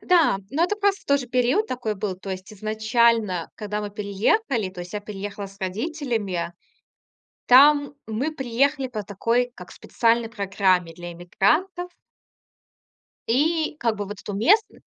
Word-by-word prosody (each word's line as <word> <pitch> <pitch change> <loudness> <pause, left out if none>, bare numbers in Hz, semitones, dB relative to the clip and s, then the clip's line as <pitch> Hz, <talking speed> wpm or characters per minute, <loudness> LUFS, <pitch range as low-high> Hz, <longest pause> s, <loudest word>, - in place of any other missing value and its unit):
Да, 340 - +3
но 320 +5 +2
это 415 - 0
просто 405 -1 0
тоже 280 -3 +1
период 255 - +2
такой 245 -4 -2
был. 190 -2 -3
То 195 +1 -8
есть 190 +2 -6
изначально, 220 -3 +1
когда 210 0 -4
мы 205 -1 -5
переехали, 210 - 0
то 185 -1 -9
есть 175 0 -8
я 210 - -2
переехала 205 0 -6
с 195 0 -16
родителями, 210 - -2 0.9
там 285 +3 +6
мы 255 +8 -2
приехали 270 +1 0
по 215 -4 -5
такой 230 +5 0
как - - -11
специальной 230 -1 +1
программе 190 -5 +1
для 175 +1 -8
иммигрантов. 310 - 0 1.4
И 310 +6 +1
как 230 -5 0
бы, 205 - -3
вот, 205 0 -8
эту 205 - -6
местн 395 - +3
220 Hz, 145 wpm, -24 LUFS, 200-280 Hz, 1.4 s, там